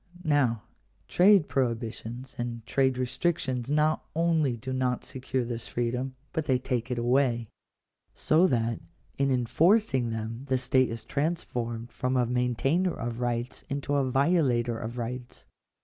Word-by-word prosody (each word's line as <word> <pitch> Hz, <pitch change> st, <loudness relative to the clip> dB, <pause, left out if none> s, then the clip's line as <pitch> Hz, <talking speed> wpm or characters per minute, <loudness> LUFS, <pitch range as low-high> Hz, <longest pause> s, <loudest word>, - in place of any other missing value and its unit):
Now 130 Hz, -8 st, +2 dB, 0.4 s
trade 190 Hz, -2 st, +5 dB
prohibitions 120 Hz, 0 st, -3 dB
and 120 Hz, -1 st, -4 dB
trade 130 Hz, +3 st, +1 dB
restrictions 130 Hz, -1 st, -1 dB
not 150 Hz, +1 st, +2 dB
only 160 Hz, -6 st, +2 dB
do 130 Hz, +3 st, -5 dB
not 130 Hz, -1 st, -1 dB
secure 130 Hz, -1 st, -3 dB
this 115 Hz, -1 st, -5 dB
freedom, 125 Hz, +2 st, -2 dB, 0.2 s
but 160 Hz, -3 st, -1 dB
they 130 Hz, -3 st, +3 dB
take 125 Hz, -1 st, -2 dB
it 125 Hz, -, -2 dB
away. 120 Hz, -2 st, +1 dB, 0.7 s
So 165 Hz, +4 st, +4 dB
that 115 Hz, -5 st, 0 dB, 0.4 s
in 140 Hz, 0 st, +2 dB
enforcing 130 Hz, -, +3 dB
them 115 Hz, +3 st, -5 dB
the 130 Hz, -, +3 dB
state 130 Hz, 0 st, +2 dB
is 115 Hz, -1 st, -6 dB
transformed 120 Hz, -5 st, -2 dB
from 130 Hz, 0 st, -1 dB
a 125 Hz, -, +3 dB
maintainer 125 Hz, -, +1 dB
of 120 Hz, 0 st, -4 dB
rights 120 Hz, +1 st, -2 dB
into 140 Hz, +1 st, -2 dB
a 140 Hz, -2 st, +2 dB
violator 135 Hz, -5 st, +2 dB
of 115 Hz, +2 st, -6 dB
rights. 125 Hz, +1 st, -6 dB
125 Hz, 140 wpm, -28 LUFS, 120-140 Hz, 0.7 s, trade